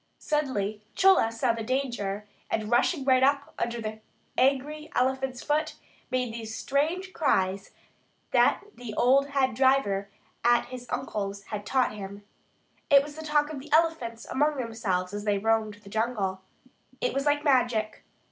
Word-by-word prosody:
Suddenly 220 -9 -1
Chola 380 -12 +5
saw 230 +1 +1
the 230 - -5
danger, 220 -5 -2 0.2
and 215 0 -2
rushing 265 +4 +2
right 260 -1 +4
up 280 +1 +2
under 235 0 -1
the 220 -1 -5 0.4
angry 280 +4 +1
elephant's 260 0 0
foot 300 +1 0 0.3
made 250 -3 -1
those 225 -1 -6
strange 335 +7 -1
cries 195 - +1 0.6
that - - +4
the 240 -4 -8
old 270 +3 +4
head 275 -3 +1
driver 220 -6 +2 0.3
at 240 0 +4
his 250 -1 -8
uncle's 200 -5 -3
had 210 -1 -6
taught 260 -4 +2
him. 200 0 -8 0.7
It 280 -2 +7
was 295 0 -9
the 315 - -7
talk 300 0 +1
of 280 - -5
the 290 +3 -12
elephants 305 -8 +1
among 295 +2 +1
themselves 210 -7 -2
as 205 0 -4
they 205 -1 +1
roamed 220 0 +1
the 200 - -12
jungle. 210 -4 -1 0.6
It 250 - 0
was 275 +2 -1
like 290 0 +2
magic. 245 -6 +1
250 Hz, 155 wpm, -27 LUFS, 215-280 Hz, 0.7 s, It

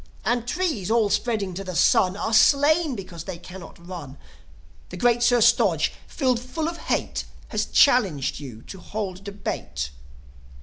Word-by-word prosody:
And 240 -1 0
trees, 305 - -1
all 220 -3 +2
spreading 210 -6 0
to 195 +3 -5
the 185 -2 -6
sun, 185 +3 +3
Are 220 +2 -2
slain 285 +6 +4
because 180 -5 -8
they 190 -3 -6
cannot 180 0 -11
run. 155 -7 -8 0.7
The 180 - -8
great 240 +4 +2
Sir 240 0 +4
Stodge, 215 -9 +3
filled 255 -5 0
full 280 +6 -4
of 335 0 -4
hate, - - -2 0.2
Has - - -1
challenged 195 - +3
you 125 -6 -9
to 190 - -10
hold 195 -2 -5
debate. 70 - -5
205 Hz, 155 wpm, -24 LUFS, 180-245 Hz, 0.7 s, slain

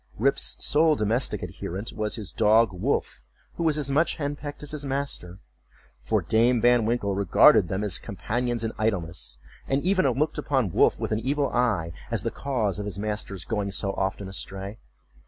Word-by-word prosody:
Rip's 135 +6 +1
sole 155 +1 +4
domestic 115 +2 -1
adherent 95 +6 -5
was 105 -1 -2
his 105 -7 -6
dog 110 +1 +4
Wolf, 90 -7 -2 0.3
who - - -6
was 155 -2 +2
as 140 -2 -2
much 155 +5 +2
hen 145 -2 -2
pecked 145 0 -8
as 145 - -8
his 150 -2 -6
master; 135 -10 -3 0.6
for 105 - 0
Dame 115 +7 +3
Van 120 -1 +4
Winkle 115 -4 0
regarded 100 - +5
them 95 +4 -2
as 100 -4 -2
companions 120 +4 -2
in 110 - -1
idleness, 90 - -2 0.3
and 135 +1 0
even 185 -3 +3
looked 150 +4 0
upon 135 - 0
Wolf - - +3
with - - -3
an 110 - +1
evil 140 +4 0
eye, 110 -10 +1 0.2
as - - -1
the - - -1
cause 115 -8 -1
of 105 - -3
his 100 -2 -4
master's 105 -3 -3
going 105 -3 -2
so 100 0 0
often 95 0 -2
astray. 95 +2 -5
110 Hz, 180 wpm, -26 LUFS, 100-140 Hz, 0.6 s, regarded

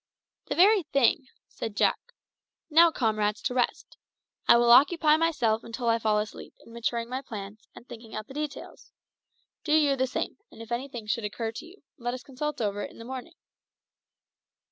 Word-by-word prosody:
"The 285 - -2
very 395 +5 +6
thing," 275 -4 +1 0.2
said 220 -2 -6
Jack. - - 0 0.6
"Now, 335 +2 +7
comrades, 215 -6 0
to 250 - -1
rest. 250 -1 -2 0.5
I - - +8
will 235 0 +4
occupy 300 +4 +6
myself 250 -9 +1
until 235 +1 -3
I 230 0 +3
fall 215 -1 +1
asleep 210 0 -5
in 230 - -15
maturing 235 0 -2
my 255 +2 -4
plans 215 -3 -9
and 240 - -14
thinking 225 -1 -10
out 215 0 -5
the - - -11
details. 300 0 -7 0.7
Do 305 - 0
you 295 -3 +4
the 260 0 0
same, - - -4
and - - -16
if 230 +1 -10
anything 240 -2 -4
should 215 +2 -1
occur 225 +2 -3
to 280 +9 -9
you 365 0 -18 0.2
let 245 +1 -2
us 255 - -9
consult 300 +2 -4
over 205 -1 -1
it - - -5
in - - -17
the 230 - -10
morning." 265 +6 -7
240 Hz, 185 wpm, -27 LUFS, 225-290 Hz, 0.7 s, I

